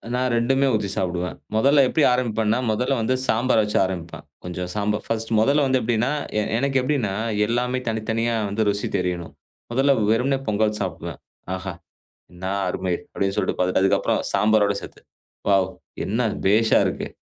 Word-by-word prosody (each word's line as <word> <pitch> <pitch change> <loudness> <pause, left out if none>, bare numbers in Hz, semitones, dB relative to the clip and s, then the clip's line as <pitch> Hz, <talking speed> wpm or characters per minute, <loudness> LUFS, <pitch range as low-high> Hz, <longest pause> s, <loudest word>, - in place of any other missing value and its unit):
நான் 125 0 0
2 120 +3 +2
மே 140 - +4
ஊத்தி 105 -2 0
சாப்பிடுவேன். 90 -1 -2 0.2
முதல்ல 140 +5 +5
எப்பிடி 150 +4 +1
ஆரம்பிப்பேன்னா, 115 -3 +1
முதல்ல 125 +5 0
வந்து 125 +3 +1
சாம்பார 115 +1 +2
வச்சு 105 - -1
ஆரம்பிப்பேன். 85 -3 -6 0.2
கொஞ்சம் 90 0 -5
சாம்பார் 105 0 -1
ஃபர்ஸ்ட் 115 0 -3
முதல்ல 140 +7 +3
வந்து 130 0 +2
எப்பிடீன்னா, 120 +3 +1 0.3
எ - - +2 0.2
எனக்கு 135 +2 +1
எப்பிடீன்னா 125 -7 0 0.3
எல்லாமே 125 +2 0
தனித்தனியா 115 +1 -1
வந்து 110 +2 0
ருசி 100 0 -1
தெரியணும். 90 -2 -3 0.4
முதல்ல 135 +3 +3 0.2
வெறுமனே 125 +5 +2
பொங்கல் 105 0 +1
சாப்பிடுவேன். - - -5 0.4
"ஆஹா 95 0 -5 0.6
என்னா 95 +2 -4 0.2
அருமை!" 90 0 -2 0.2
அப்பிடீன்னு 95 0 -2
சொல்லிட்டு - - 0
பார்த்துட்டு 90 0 +2
அதுக்கப்புறம் 95 - +2
சாம்பாரோட 105 -1 +3
சேர்த்து, - - -11 0.5
"வாவ்! 95 -2 +4 0.4
என்ன 110 +5 0 0.3
பேஷா 110 +3 +4
இருக்கு!" - - -2
110 Hz, 155 wpm, -23 LUFS, 95-125 Hz, 0.6 s, முதல்ல